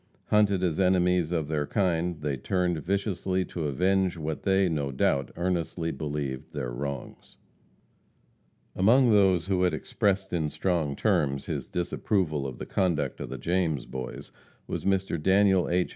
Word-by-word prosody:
Hunted 100 -3 +3
as 85 -2 0
enemies 90 -2 +3
of 80 -4 -1
their 75 -2 -1
kind, 90 -5 0
they 70 -2 -1
turned 90 +4 -1
viciously 95 +1 -1
to 85 -1 -4
avenge 90 +5 +1
what 80 -1 -4
they, 95 0 +3
no 75 -5 -1
doubt, 70 0 +1
earnestly 85 -1 -1
believed 70 -4 -4
their - - -3
wrongs. 70 +1 -6 1.4
Among 120 +6 +5
those 95 -5 +4
who 95 -2 0
had 90 -1 +2
expressed 95 -2 -1
in 80 -3 0
strong 80 -5 -1
terms 70 -1 +1
his - - -4
disapproval 85 -4 -1
of 65 -2 -7
the - - -6
conduct 85 -5 0
of - - -5
the 65 - -5
James 80 -1 0
Boys, 65 -1 -7 0.3
was - - -5
Mr. 95 -4 0
Daniel 95 +1 +4
H. 90 0 +1
90 Hz, 150 wpm, -27 LUFS, 75-95 Hz, 1.4 s, Among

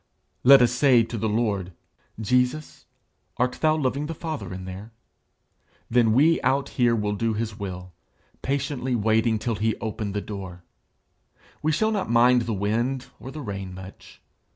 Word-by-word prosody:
Let 135 0 +8
us 120 - +3
say 125 -2 +4
to 115 - -6
the 110 0 -1
Lord, 105 -5 -1 0.5
'Jesus, 125 +6 -1 0.5
art 125 +1 0
thou 155 -1 +4
loving 140 0 -1
the 165 - -5
Father 150 - -5
in 95 0 -7
there? 95 +4 -8 1.0
Then 115 -2 +4
we 155 +7 +4
out 135 +2 +1
here 120 -2 +2
will 105 -2 -1
do 110 +2 -1
his 110 -1 -4
will, 90 -2 -6 0.5
patiently 135 -2 -1
waiting 110 +1 +2
till 115 +2 -2
he 110 +1 0
open 110 -2 -4
the 105 - -1
door. 95 -4 -8 1.0
We 155 - +1
shall 220 +8 +1
not 205 - -2
mind 120 +1 +5
the 115 -1 -2
wind 120 +6 -1
or 130 - -8
the 150 +3 -7
rain 100 -5 -6
much. 95 +1 -12
115 Hz, 160 wpm, -25 LUFS, 105-130 Hz, 1.0 s, Let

